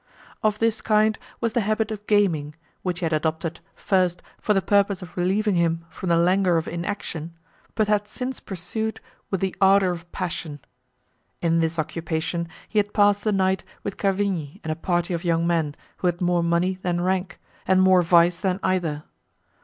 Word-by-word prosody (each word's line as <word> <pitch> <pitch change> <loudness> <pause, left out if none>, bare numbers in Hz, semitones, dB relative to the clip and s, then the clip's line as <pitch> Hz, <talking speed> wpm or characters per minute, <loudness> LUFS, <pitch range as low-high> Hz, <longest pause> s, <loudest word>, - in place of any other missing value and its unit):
Of 215 -1 +1
this 225 0 +1
kind 215 0 +2 0.2
was 230 -2 0
the 235 - +2
habit 215 +1 0
of 210 -1 -7
gaming, 165 -8 +2 0.3
which 180 -1 -3
he - - 0
had 165 - 0
adopted, 160 +1 -1 0.2
first, 180 -2 +1 0.2
for 210 - +1
the - - +5
purpose 200 -1 +2
of 175 - -12
relieving 195 +4 +1
him 165 -1 +1
from 185 - -5
the 170 - +4
languor 180 +1 +3
of 160 - -2
inaction, 170 -2 -4 0.4
but 215 -2 +2
had 210 -1 +1
since 255 +4 -4
pursued 215 +4 -4 0.3
with 195 - -2
the 190 -1 -1
ardour 195 -1 +5
of 175 0 -8
passion. 165 -5 -4 0.8
In 165 -1 +2
this 165 0 0
occupation 165 +1 -2 0.2
he 215 - +1
had 205 0 -1
passed 205 -1 +4
the 215 - +1
night 190 -1 +1 0.2
with 200 - -4
Cavigni 195 -7 -1
and 160 - -2
a - - -1
party 175 +1 -1
of 170 +1 -3
young 165 -1 +1
men, 165 -4 0 0.2
who 180 - 0
had 175 0 0
more 175 -1 +2
money 170 +2 +1
than 175 -1 -1
rank, 185 0 -1 0.3
and 190 0 +4
more 185 -1 +6
vice 170 0 +4
than 190 -1 0
either. 165 -5 0
180 Hz, 185 wpm, -24 LUFS, 170-200 Hz, 0.8 s, more